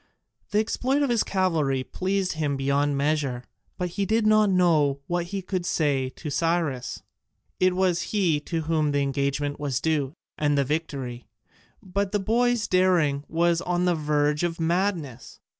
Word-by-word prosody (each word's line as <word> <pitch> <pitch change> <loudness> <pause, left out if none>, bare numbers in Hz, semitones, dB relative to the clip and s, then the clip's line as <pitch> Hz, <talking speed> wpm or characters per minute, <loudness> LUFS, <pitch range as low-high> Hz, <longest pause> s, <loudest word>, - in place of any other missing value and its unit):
The 205 - 0
exploit 260 +6 +1
of 275 - +1
his 235 -3 +2
cavalry 160 -9 0
pleased 190 +4 -1
him 150 -3 -1
beyond 140 +1 +1
measure, 140 -4 0 0.3
but 180 -1 -2
he 195 +3 -2
did 220 0 +2
not 215 -1 +5
know 160 -7 +3
what 175 0 -1
he 195 +2 -5
could 185 -1 -2
say 145 -6 0
to 150 +3 -7
Cyrus. 165 -4 -1 0.6
It 185 0 +3
was 185 -2 +1
he 180 -8 +2
to 165 -2 -1
whom 155 -2 0
the 145 - +2
engagement 140 +1 -1
was 140 -4 -1
due, 150 -4 0 0.3
and 145 -1 +2
the 140 - +3
victory; 135 -5 -4 0.6
but 200 +1 -2
the 205 - +2
boy's 230 +2 +1
daring 175 -7 +2
was 170 +1 +1
on 180 0 0
the 180 - +3
verge 150 -1 +1
of 170 -1 -2
madness. 165 - -2
165 Hz, 160 wpm, -25 LUFS, 145-185 Hz, 0.6 s, not